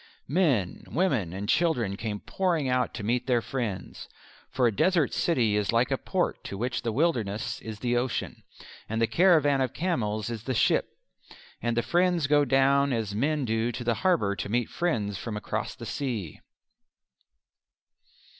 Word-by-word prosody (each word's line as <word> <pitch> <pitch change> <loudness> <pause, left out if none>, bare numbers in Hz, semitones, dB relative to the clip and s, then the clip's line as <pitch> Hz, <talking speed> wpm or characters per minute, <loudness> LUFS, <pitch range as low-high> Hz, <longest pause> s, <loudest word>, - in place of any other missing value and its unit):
Men, 135 - +1
women 135 - 0
and 100 +3 -5
children 125 - +1
came 105 0 -4
pouring 175 -7 0
out 125 0 +1
to 105 - -5
meet 120 +5 0
their 125 -2 +3
friends: 115 -6 -5 0.4
for 125 0 +1
a 115 -4 +2
desert 175 - +2
city 120 -11 +1
is 105 -1 +1
like 120 +3 +2
a 135 - +2
port 185 -2 -1
to 100 - -5
which 120 +2 -2
the 115 - -2
wilderness 110 -6 -1
is 110 -1 -7
the 120 -1 0
ocean, 120 0 -2 0.5
and 110 +1 -1
the 115 - +4
caravan 145 +1 +4
of 130 -3 -1
camels 110 - -1
is 115 -1 -6
the 130 - -1
ship, - - +3 0.7
and 120 0 -1
the 120 - +2
friends 175 +3 +2
go 145 0 +4
down 135 +1 +3
as 110 -4 -1
men 145 +6 0
do 115 +1 0
to 120 +1 -5
the 120 0 +1
harbour 165 - +2
to - - -4
meet 120 +2 0
friends 105 - -1
from 110 -3 -4
across - - -3
the - - -9
sea. 115 - -4
120 Hz, 170 wpm, -27 LUFS, 110-145 Hz, 0.7 s, the